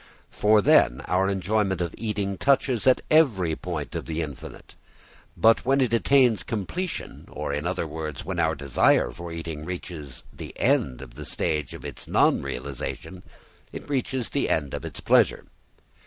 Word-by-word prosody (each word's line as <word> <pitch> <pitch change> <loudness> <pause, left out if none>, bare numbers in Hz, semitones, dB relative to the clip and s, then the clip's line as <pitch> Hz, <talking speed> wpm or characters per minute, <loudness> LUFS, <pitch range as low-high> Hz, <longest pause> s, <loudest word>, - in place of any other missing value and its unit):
For 105 0 +3
then 65 -5 +4
our 95 +1 +1
enjoyment 100 0 0
of 85 -1 -2
eating 105 -3 -2
touches 130 -1 +2
at 130 - +5
every 105 - +4
point 80 -5 -5
the 80 0 -3
infinite. 70 -3 -10 0.6
But, 115 0 +4
when 135 +2 +2
it 125 -4 +1
attains 120 -3 +4
completion, 115 - -5
or - - -4
in 75 +4 -2
other 90 -1 -2
words, 75 -3 -6
when 90 0 -3
our 80 -1 +2
desire 70 -2 +2
for 85 0 -8
eating 80 -2 -6
reaches 80 -6 -7
the - - -9
end 65 0 +1
of - - -12
the 75 +4 -9
stage 75 -3 -1
of - - -11
its - - -7
non - - +3
realisation, 70 +7 -6 0.5
it - - -8
reaches 130 -3 -2
the 140 - 0
end 75 -4 0
of - - -4
its - - -6
pleasure. - - +3
90 Hz, 160 wpm, -25 LUFS, 75-110 Hz, 0.6 s, at